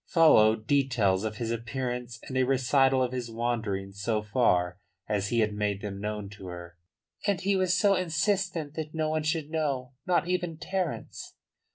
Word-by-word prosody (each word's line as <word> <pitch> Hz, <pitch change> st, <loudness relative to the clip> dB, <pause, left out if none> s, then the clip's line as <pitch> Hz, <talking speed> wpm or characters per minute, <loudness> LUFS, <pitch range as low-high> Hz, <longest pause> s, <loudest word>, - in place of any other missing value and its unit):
Followed 110 Hz, -10 st, +5 dB
details 115 Hz, -8 st, +2 dB
of 110 Hz, -1 st, -3 dB
his 115 Hz, 0 st, -3 dB
appearance 120 Hz, +1 st, -4 dB
and 130 Hz, -, -6 dB
a 130 Hz, -, +3 dB
recital 130 Hz, 0 st, +3 dB
of 125 Hz, -, -1 dB
his 125 Hz, -2 st, -4 dB
wanderings 110 Hz, -4 st, -3 dB
so 110 Hz, 0 st, 0 dB
far 95 Hz, -5 st, +1 dB, 0.3 s
as 105 Hz, -2 st, 0 dB
he 120 Hz, -1 st, +2 dB
had 105 Hz, -1 st, +1 dB
made 105 Hz, -1 st, -1 dB
them 100 Hz, -1 st, -5 dB
known 105 Hz, -1 st, -3 dB
to 100 Hz, -2 st, -10 dB
her. 85 Hz, -1 st, -8 dB, 0.5 s
"And 200 Hz, -4 st, +2 dB
he 195 Hz, +1 st, +1 dB
was 185 Hz, -1 st, +2 dB
so 200 Hz, +2 st, +4 dB
insistent 180 Hz, -2 st, 0 dB
that 155 Hz, 0 st, -5 dB
no 155 Hz, -1 st, 0 dB
one 155 Hz, 0 st, 0 dB
should 155 Hz, 0 st, -1 dB
know, 140 Hz, -6 st, -1 dB, 0.2 s
not 175 Hz, -1 st, +2 dB
even 175 Hz, -3 st, -1 dB
Terence." 185 Hz, -1 st, -4 dB
125 Hz, 175 wpm, -28 LUFS, 105-160 Hz, 0.5 s, Followed